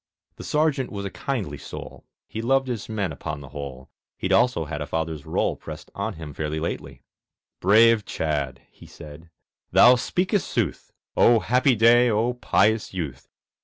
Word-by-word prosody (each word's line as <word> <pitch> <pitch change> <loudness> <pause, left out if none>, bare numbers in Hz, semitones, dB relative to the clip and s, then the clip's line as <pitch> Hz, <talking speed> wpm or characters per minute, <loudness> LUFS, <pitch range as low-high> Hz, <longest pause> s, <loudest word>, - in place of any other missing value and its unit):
The - - -8
Sergeant 150 -4 0
was 100 -1 -5
a 100 - -4
kindly 100 - -4
soul, - - -10 0.2
He 110 - -5
loved 135 +3 +2
his 120 -5 -4
men 100 -5 -2
upon 75 +1 -5
the 70 -2 -11
whole, 70 -3 -8 0.3
He'd 95 - -1
also 95 -4 +3
had 75 0 -5
a 75 - -4
father's 80 -2 -3
rôle - - -1
Pressed - - -9
on - - -3
him 80 -2 -8
fairly 75 +1 -3
lately. 80 - -5 0.6
"Brave 110 +3 +5
Chadd," 70 -8 -3
he - - -16
said, 80 +1 -12 0.4
"thou 125 - +8
speakest 180 - 0
sooth! 100 - -2 0.2
O 120 -1 +5
happy 125 +3 +2
day! 120 +2 +5
O 115 +3 +1
pious 110 -4 +1
youth! 75 -8 -5
100 Hz, 165 wpm, -24 LUFS, 75-120 Hz, 0.6 s, thou